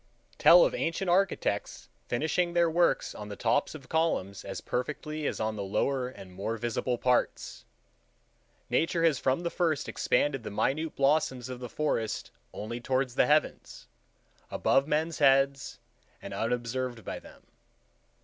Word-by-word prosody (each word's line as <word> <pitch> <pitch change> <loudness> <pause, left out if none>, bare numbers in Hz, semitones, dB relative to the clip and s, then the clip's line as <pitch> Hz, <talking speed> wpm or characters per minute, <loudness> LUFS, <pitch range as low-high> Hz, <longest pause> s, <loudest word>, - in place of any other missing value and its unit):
Tell - - +8
of - - -1
ancient 180 - -1
architects 180 - 0 0.2
finishing 160 +7 0
their 170 -1 +3
works 170 +1 +2
on 105 0 -8
the 100 - -6
tops 145 - 0
of 135 -5 -11
columns 160 - -1
as 95 -1 -6
perfectly 150 +4 -3
as - - -3
on 110 0 -1
the 105 - -4
lower 125 +6 0
and 95 -7 -11
more 110 +5 -3
visible 120 +2 -2
parts! 125 +1 -1 1.0
Nature 165 0 +1
has 160 -5 +3
from 130 +5 +1
the 170 -1 -2
first 165 -4 0
expanded 140 -3 0
the 110 - -6
minute 150 +9 -1
blossoms 135 -3 +1
of 125 -1 -6
the 125 -1 -7
forest 115 -7 -2 0.2
only 115 +3 -6
toward 130 +1 0
the 125 - +2
heavens, 150 +1 0 0.6
above 135 +1 +2
men's 155 +2 -1
heads 135 -1 +3 0.4
and - - -8
unobserved 120 -2 -2
by - - -5
them. - - -16
135 Hz, 150 wpm, -29 LUFS, 120-160 Hz, 1.0 s, Tell